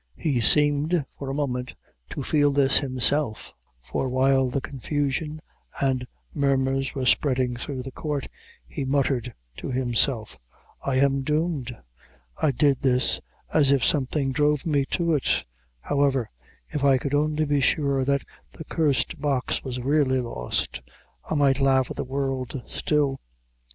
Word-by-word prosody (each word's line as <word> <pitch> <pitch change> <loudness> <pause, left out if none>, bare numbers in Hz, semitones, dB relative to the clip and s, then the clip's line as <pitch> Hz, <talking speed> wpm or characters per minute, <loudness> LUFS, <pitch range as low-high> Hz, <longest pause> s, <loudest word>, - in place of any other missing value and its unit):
He 140 -6 0
seemed, 145 +5 +3
for 140 - -5
a - - -2
moment, 125 -3 -2 0.3
to 140 - -5
feel 145 +1 +3
this 140 -1 +4
himself; 130 -2 +1 0.3
for 130 - -2
while 130 0 +3
the 130 - -1
confusion 145 +3 -3 0.4
and 130 -2 0 0.3
murmurs 135 -1 0
were 130 -2 -2
spreading 125 -2 +2
through 130 +1 -5
the 135 - -7
court, 145 0 -3 0.4
he 100 - -5
muttered 130 -2 0 0.3
to - - -6
himself 120 - 0 0.4
"I 135 - -1
am 135 +1 +3
doomed; 150 -4 -1 0.6
I 155 - +3
did 140 0 +2
this, 130 -1 +2 0.3
as 145 -3 +4
if 135 -3 +3
something 140 -1 +1
drove 150 +1 +1
me 145 -4 +1
to 170 +2 0
it; 145 - +1 0.4
however, 140 -4 +1 0.4
if 145 - -3
I 135 -2 +5
could 140 +2 -4
only 150 +1 +1
be 145 -1 +1
sure 140 0 +2
that 140 +1 +1 0.3
the 160 - -9
cursed 155 -1 0
box 140 -4 -1
was 130 -2 -4
really 135 -1 +2
lost, 65 - -3 0.5
I - - 0
might 140 -2 +3
laugh 135 -1 +3
at - - -5
the - - -2
world 135 0 -3
still." 145 -3 0
135 Hz, 145 wpm, -25 LUFS, 130-145 Hz, 0.6 s, I